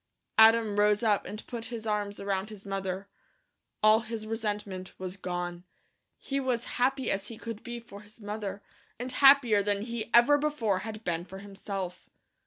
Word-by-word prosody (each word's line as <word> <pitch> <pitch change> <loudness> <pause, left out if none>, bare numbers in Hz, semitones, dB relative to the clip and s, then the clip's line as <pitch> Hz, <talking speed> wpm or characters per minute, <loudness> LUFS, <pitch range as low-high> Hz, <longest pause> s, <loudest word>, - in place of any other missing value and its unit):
Adam 220 -2 +6
rose 210 +1 +4
up 210 -3 +2
and 210 +1 -7
put 235 -2 -5
his 230 -2 -6
arms 210 -1 -1
around 200 0 -2
his 210 -2 -11
mother. 195 0 -3 0.8
All 215 +1 +7
his 225 -1 -6
resentment 210 -4 -4
was 185 0 -5
gone. 175 -2 -4 0.5
He 275 0 -2
was 250 -3 -1 0.2
happy 265 +1 +2
as 195 +1 -2
he 230 - -8
could 230 -1 -6
be 240 -1 -6
for 205 -3 -12
his 210 +2 -18
mother, 205 -1 -5 0.4
and 250 +1 -3
happier 270 -7 +6
than 200 0 0
he 235 -1 -4
ever 265 +5 +6
before 250 -10 0
had 215 +2 -7
been 170 -3 -1
for 190 +1 -10
himself. 195 -2 -6
210 Hz, 170 wpm, -29 LUFS, 195-230 Hz, 0.8 s, All